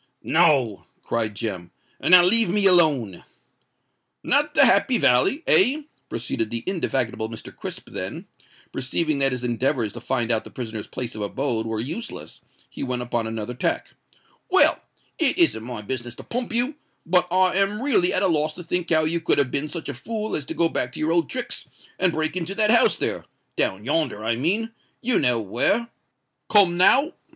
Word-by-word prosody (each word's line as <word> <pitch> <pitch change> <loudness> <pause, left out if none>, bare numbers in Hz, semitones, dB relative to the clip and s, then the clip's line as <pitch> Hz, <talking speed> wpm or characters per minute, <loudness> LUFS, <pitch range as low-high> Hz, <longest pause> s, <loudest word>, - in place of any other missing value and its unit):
"No," 145 - +2 0.2
cried 110 -3 -2
Jem; 95 -6 -5 0.3
"and - - -1
now 180 -1 +9
leave 225 +2 +9
me 205 +2 +2
alone." 150 - +2 1.0
"Not - - +1
the - - +6
Happy - - +3
Valley—eh?" 305 - +3 0.3
proceeded 115 -1 -3
the 115 0 -4
indefatigable 130 - -2
Mr. 115 -1 -10
Crisp: - - -7
then, - - -6 0.5
perceiving 150 +3 -1
that 135 0 +3
his 125 -1 -3
endeavours 120 -2 -1
to 120 - -9
find 120 -2 -1
out 110 -1 +1
the - - -12
prisoner's 110 -4 -7
place 125 -2 -5
of 110 - -7
abode 115 +1 -2
were 110 -1 -3
useless, 160 - -7 0.3
he - - -11
went 125 -2 -3
upon 120 -2 -2
another 110 +1 -5
tack. 125 - -2 0.6
"Well—it 355 -5 +1
isn't 335 - +2
my 120 -3 -7
business 120 +1 -5
to - - -11
pump 245 0 -4
you; 245 +6 -1 0.3
but 180 +2 +2
I 185 +1 +2
am 195 +2 +1
really 240 -9 +1
at - - 0
a - - +3
loss 155 -2 0
to 175 - -10
think 175 +1 -2
how 155 -1 +3
you 165 +2 -1
could - - +1
have 140 -3 +1
been 145 +2 -2
such 165 0 -7
a 145 - -4
fool 215 - -4
as 145 -3 -5
to - - -6
go 170 - +2
back 125 -6 -3
to - - -8
your 155 +1 0
old 170 0 +1
tricks 255 -1 -5 0.3
and 185 - +3
break 155 +1 -2
into 185 +2 -4
that 215 0 +2
house 235 - +4
there—down 95 +3 -3
yonder, 135 -7 -1
I 115 +1 0
mean—you 225 - -2
know 125 -4 +1
where? 120 - 0 0.6
Come 195 -5 +4
now?" 270 - +4
150 Hz, 180 wpm, -23 LUFS, 120-190 Hz, 1.0 s, now